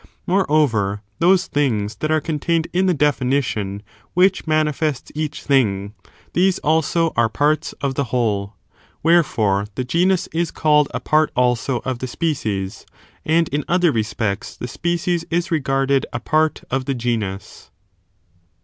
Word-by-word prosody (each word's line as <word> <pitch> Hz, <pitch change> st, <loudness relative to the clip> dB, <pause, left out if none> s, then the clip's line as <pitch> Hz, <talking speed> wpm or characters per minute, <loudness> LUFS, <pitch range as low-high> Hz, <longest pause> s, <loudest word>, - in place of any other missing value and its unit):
Moreover, 140 Hz, -, +1 dB, 0.2 s
those 185 Hz, +2 st, +4 dB
things 110 Hz, -, -1 dB
that 155 Hz, -, -2 dB
are 155 Hz, 0 st, +3 dB
contained 160 Hz, +1 st, -1 dB
in 185 Hz, +2 st, +2 dB
the 180 Hz, -, +3 dB
definition 130 Hz, -8 st, 0 dB, 0.3 s
which 185 Hz, -1 st, +3 dB
manifests 155 Hz, -2 st, 0 dB
each 150 Hz, -1 st, -4 dB
thing, 105 Hz, -8 st, +1 dB, 0.4 s
these 185 Hz, +1 st, +3 dB
also 160 Hz, +1 st, +1 dB
are 115 Hz, -1 st, +3 dB
parts 150 Hz, +6 st, 0 dB
of 140 Hz, -1 st, -1 dB
the 140 Hz, +1 st, -1 dB
whole. 105 Hz, -5 st, -1 dB, 0.5 s
Wherefore, 110 Hz, -, +2 dB
the 130 Hz, -, -2 dB
genus 175 Hz, +7 st, +1 dB
is 165 Hz, 0 st, 0 dB
<mlled 150 Hz, -2 st, +3 dB
a -, -, -3 dB
part 155 Hz, 0 st, +2 dB
also 125 Hz, 0 st, +1 dB
of 130 Hz, -2 st, -2 dB
the 130 Hz, -, -4 dB
species, 110 Hz, -, -2 dB, 0.4 s
and 165 Hz, +1 st, +3 dB
in 145 Hz, +1 st, -1 dB
other 180 Hz, -2 st, +3 dB
respects 110 Hz, -2 st, -2 dB
the 125 Hz, -, -5 dB
species 170 Hz, +4 st, -1 dB
is 175 Hz, +2 st, 0 dB
reg£urded 135 Hz, -3 st, +1 dB
a 120 Hz, -, -3 dB
part 155 Hz, +4 st, +1 dB
of 130 Hz, 0 st, -1 dB
the 135 Hz, -, -1 dB
genus. 110 Hz, -5 st, -4 dB
145 Hz, 140 wpm, -20 LUFS, 115-160 Hz, 0.5 s, those